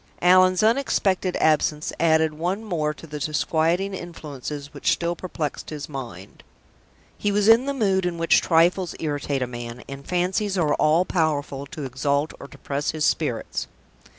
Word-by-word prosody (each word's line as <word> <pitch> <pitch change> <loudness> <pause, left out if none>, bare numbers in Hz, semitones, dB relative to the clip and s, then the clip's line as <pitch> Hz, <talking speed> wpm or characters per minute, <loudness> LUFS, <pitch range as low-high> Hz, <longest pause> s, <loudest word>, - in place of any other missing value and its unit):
Allan's 185 +1 +5
unexpected 210 -6 +1
absence 150 -1 +1
added 160 -1 +3
one 180 +7 -2
more 165 -8 -1
to 150 - -11
the 150 -1 -7
disquieting 165 +6 0
influences 150 -5 -7
which - - 0
still 170 0 -2
perplexed 165 -4 -5
his 150 -2 -6
mind. 120 - -8 0.8
He 205 - 0
was 205 0 +2
in 230 +4 +6
the 280 - 0
mood 190 -6 +1
in 170 -1 -3
which 165 0 +4
trifles 175 +2 +2
irritate 145 -3 -2
a - - 0
man, 120 0 -7
and 140 0 -8
fancies 185 +4 -1
are 155 -4 +2
all 160 +5 +3
powerful 145 -5 -1
to 155 0 -7
exalt 140 +3 -1
or - - -9
depress 140 +1 -4
his 155 -1 0
spirits. - - -1
160 Hz, 155 wpm, -24 LUFS, 145-185 Hz, 0.8 s, in